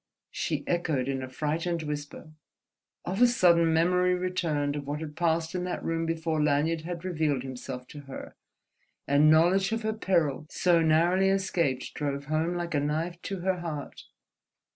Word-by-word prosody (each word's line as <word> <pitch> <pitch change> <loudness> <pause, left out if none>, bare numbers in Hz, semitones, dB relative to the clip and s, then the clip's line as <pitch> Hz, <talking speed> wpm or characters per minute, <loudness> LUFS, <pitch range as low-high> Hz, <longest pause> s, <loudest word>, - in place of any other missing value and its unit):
she - - -2
echoed 160 -7 0
in 135 -1 -2
a 130 - -6
frightened 160 +5 -2
whisper. 150 +1 -6 0.7
Of 190 +6 -2
a 245 - +8
sudden 170 -8 +4
memory 180 +3 +3
returned 165 -6 -1
of 145 -1 -5
what 145 +1 -3
had 155 -2 -7
passed 165 -1 0
in 180 -1 -2
that 180 - -4
room 165 0 -1
before 160 -1 -1
Lanyard 150 +2 +1
had 170 +1 -6
revealed 155 -7 0
himself 130 -1 -7
to 145 - -9
her, - - -8 0.7
and 145 +2 +5
knowledge 180 +6 +4
of 225 0 -2
her 220 0 0
peril 165 -8 0
so 175 -2 +3
narrowly 170 +4 +3
escaped 175 -9 0
drove 140 -1 -3
home 155 +4 0
like 175 -1 -3
a 145 - +2
knife 160 +4 -2
to 195 -3 -5
her 185 0 0
heart. 155 -5 -6
165 Hz, 165 wpm, -28 LUFS, 150-180 Hz, 0.7 s, a